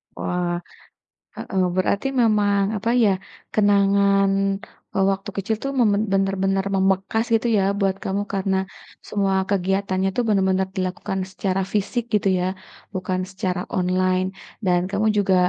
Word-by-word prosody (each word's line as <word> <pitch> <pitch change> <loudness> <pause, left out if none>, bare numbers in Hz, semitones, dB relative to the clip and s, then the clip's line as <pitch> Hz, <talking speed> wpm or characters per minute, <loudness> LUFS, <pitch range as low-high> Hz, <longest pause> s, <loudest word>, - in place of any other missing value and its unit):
Wah, 175 -1 -2 0.7
heeh. 190 - -2 0.2
Berarti 200 +7 +1
memang 205 -3 +3 0.2
apa 230 +4 -2
ya, 205 - +5 0.4
kenangan, 200 -1 +4 0.6
eee, 195 - +2
waktu 195 +1 -4
kecil 205 +3 0
tuh 275 - -1
memang 210 -3 +3
bener-bener 195 0 +1
membekas 195 +3 +1
gitu 225 +1 +2
ya 195 - +3 0.2
buat 195 -1 +1
kamu. 195 +1 -1
Karena 195 0 0 0.5
semua 195 -2 0
kegiatannya 190 0 0
tuh 245 - +1
bener-bener 190 -2 +2
dilakukan 190 +1 -2
secara 190 0 -1
fisik 210 +4 0
gitu 205 -1 +2
ya 180 - 0 0.5
bukan 185 0 -1
secara 185 -1 -2 0.2
online. 185 0 +1 0.4
Dan 180 -1 +3
kamu 210 +2 +1
juga, 195 -2 +3
195 Hz, 130 wpm, -22 LUFS, 190-200 Hz, 0.7 s, ya